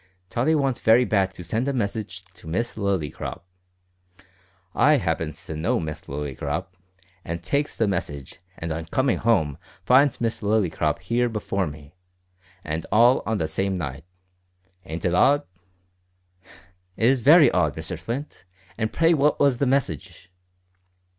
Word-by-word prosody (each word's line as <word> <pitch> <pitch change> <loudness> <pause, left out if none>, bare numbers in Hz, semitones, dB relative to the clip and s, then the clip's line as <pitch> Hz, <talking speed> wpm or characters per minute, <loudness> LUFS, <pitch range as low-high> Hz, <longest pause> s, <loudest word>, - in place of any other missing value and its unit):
Tottie 140 +7 +2
wants 135 -4 0
very 115 +3 +5
bad 95 -4 +1
to 90 - -8
send 110 - -2
a 140 - 0
message 100 -5 -3
to 85 - -15
Miss 115 +9 -2
Lillycrop. 95 -10 -3 1.3
I 150 +2 +4
happens 80 - -3
to 80 - -6
know 80 +3 0
Miss 75 -1 -5
Lillycrop, 70 +5 -4 0.5
an' 85 - -4
takes 140 - -2
the 110 - +2
message, 75 -9 -4 0.2
and 80 0 -5
on 80 +1 -4
coming 130 +9 0
home 80 -11 +1 0.3
finds 135 +1 +4
Miss 115 -1 -1
Lillycrop 105 -5 0
here 120 +1 0
before 100 -4 -2
me 75 0 -11 0.7
and 80 +1 -3
all 120 +4 +5
on 110 -1 0
the 80 - -1
same 95 +5 -1
night 70 -4 -5 0.8
ain't 80 +3 -6
it 90 - +1
odd?" 145 +10 +4 1.5
"It 110 - +1
is 130 +1 +4
very 150 +5 +7
odd, 80 -5 +1
Mr 80 +3 -5
Flint; 115 - -6 0.3
and 110 -1 -1
pray 165 +1 +3
what 150 -1 +2
was 140 -3 +3
the 140 - +2
message?" 95 - -2
100 Hz, 145 wpm, -24 LUFS, 80-125 Hz, 1.5 s, very